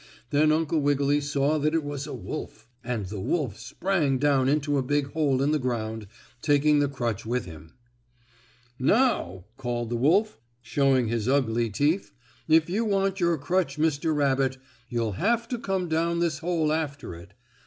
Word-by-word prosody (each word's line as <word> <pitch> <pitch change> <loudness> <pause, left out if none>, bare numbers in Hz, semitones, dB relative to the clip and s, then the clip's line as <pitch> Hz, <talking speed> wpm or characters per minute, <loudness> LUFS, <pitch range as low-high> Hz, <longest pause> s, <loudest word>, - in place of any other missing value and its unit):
Then 155 +1 +4
Uncle 160 0 +1
Wiggily 145 0 +2
saw 145 +1 +1
that 155 +2 +1
it 165 - +1
was 145 0 -5
a - - -6
wolf, - - -7 0.2
and 120 -6 -3
the 100 +2 -6
wolf 120 - -2
sprang 140 +3 0
down 135 -1 +2
into 145 -1 +1
a - - +1
big 140 +1 -1
hole 140 -4 +1
in 145 - +2
the 155 - +1
ground, 110 -4 -3 0.3
taking 145 0 +3
the 145 - +2
crutch 120 -6 -3
with 125 +3 -2
him. 80 0 -12 1.1
"Now," 130 - +1
called 120 -3 -3
the - - 0
wolf, 165 - +2 0.2
showing 130 0 +2
his 115 +1 -1
ugly 120 -4 +1
teeth, 145 - 0 0.3
"if 160 0 +4
you 200 +6 0
want 195 -2 0
your 170 -2 +2
crutch, 155 0 -1
Mr. 155 0 +1
Rabbit, 135 -2 +1 0.3
you'll 115 -5 -2
have 235 +3 +1
to 245 - -3
come 190 -4 -2
down 165 +1 0
this 170 -5 0
hole 160 -2 0
after 145 - -3
it. 85 +1 -13
145 Hz, 170 wpm, -26 LUFS, 125-160 Hz, 1.1 s, Then